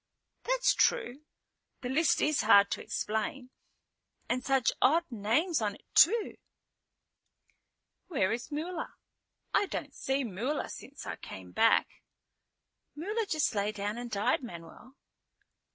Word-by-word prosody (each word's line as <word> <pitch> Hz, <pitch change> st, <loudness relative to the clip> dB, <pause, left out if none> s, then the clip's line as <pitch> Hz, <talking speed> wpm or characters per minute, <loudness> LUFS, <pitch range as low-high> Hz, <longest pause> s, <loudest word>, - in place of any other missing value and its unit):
"That's -, -, +3 dB
true. 300 Hz, -, +1 dB, 0.6 s
The 250 Hz, -, -4 dB
list 310 Hz, +5 st, +2 dB
is 305 Hz, 0 st, +2 dB
hard 200 Hz, -2 st, +6 dB
to -, -, -2 dB
explain. 235 Hz, +5 st, -3 dB, 0.8 s
And 250 Hz, +1 st, -1 dB
such 270 Hz, -3 st, +2 dB
odd 325 Hz, +6 st, +4 dB
names 240 Hz, -, +1 dB
on 205 Hz, -2 st, -1 dB
it -, -, -20 dB
too." 430 Hz, +6 st, +4 dB, 1.7 s
"Where 265 Hz, -, +1 dB
is 240 Hz, +6 st, -4 dB
Mula? 330 Hz, +4 st, -4 dB, 0.6 s
I 405 Hz, -, +3 dB
don't 290 Hz, -5 st, -5 dB
see 270 Hz, 0 st, -1 dB
Mula 235 Hz, +7 st, -3 dB
since -, -, -10 dB
I -, -, -5 dB
came -, -, -10 dB
back." -, -, +2 dB, 0.9 s
"Mula 420 Hz, +8 st, -2 dB
just 310 Hz, -4 st, +1 dB
lay 205 Hz, 0 st, 0 dB
down 210 Hz, +2 st, -4 dB
and 240 Hz, 0 st, -6 dB
died, 215 Hz, +5 st, +1 dB
Manuel." 235 Hz, +4 st, -11 dB
260 Hz, 125 wpm, -30 LUFS, 220-320 Hz, 1.7 s, hard